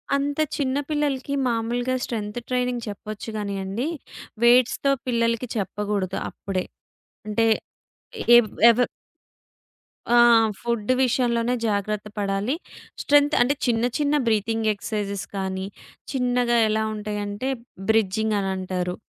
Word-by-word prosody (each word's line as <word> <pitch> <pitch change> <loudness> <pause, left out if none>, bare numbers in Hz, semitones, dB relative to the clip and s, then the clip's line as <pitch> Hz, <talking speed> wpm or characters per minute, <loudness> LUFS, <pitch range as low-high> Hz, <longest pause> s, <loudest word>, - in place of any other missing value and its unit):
అంత 285 +2 -1 0.2
చిన్న 270 -1 0
పిల్లలకి 285 -2 -1
మామూలుగా 240 +2 -1
స్ట్రెంత్ 215 0 -4
ట్రైనింగ్ 250 -1 -1
చెప్పొచ్చు 210 +2 -7
గానియండి 200 +4 -3 0.6
వెయిట్స్‌తో 250 +3 +4 0.2
పిల్లలకి 230 0 0
చెప్పగూడదు 205 -1 -2
అప్పుడే. 190 -2 -4 0.6
అంటే 225 +2 +2 0.9
ఏవ్ 240 -2 +5 0.2
ఎవరు 245 +2 +3 1.3
ఆ! - - +5 0.5
ఫుడ్ 235 -2 -2
విషయంలోనే 240 -1 +1
జాగ్రత్త 210 0 -1
పడాలి. 200 +6 0 0.5
స్ట్రెంత్ 290 +1 +4
అంటే 250 +4 +3
చిన్న 230 -2 +1
చిన్న 295 0 +1
బ్రీతింగ్ 220 0 +1
ఎక్సర్సైజెస్ 200 -1 -4
కానీ, 190 0 -3 0.5
చిన్నగా 245 -2 +1
ఎలా 220 0 +1
ఉంటాయంటే 210 +3 -4 0.4
బ్రిడ్జింగ్ 220 0 +2
అనంటారు. 185 -2 -2
225 Hz, 100 wpm, -24 LUFS, 205-250 Hz, 1.3 s, ఏవ్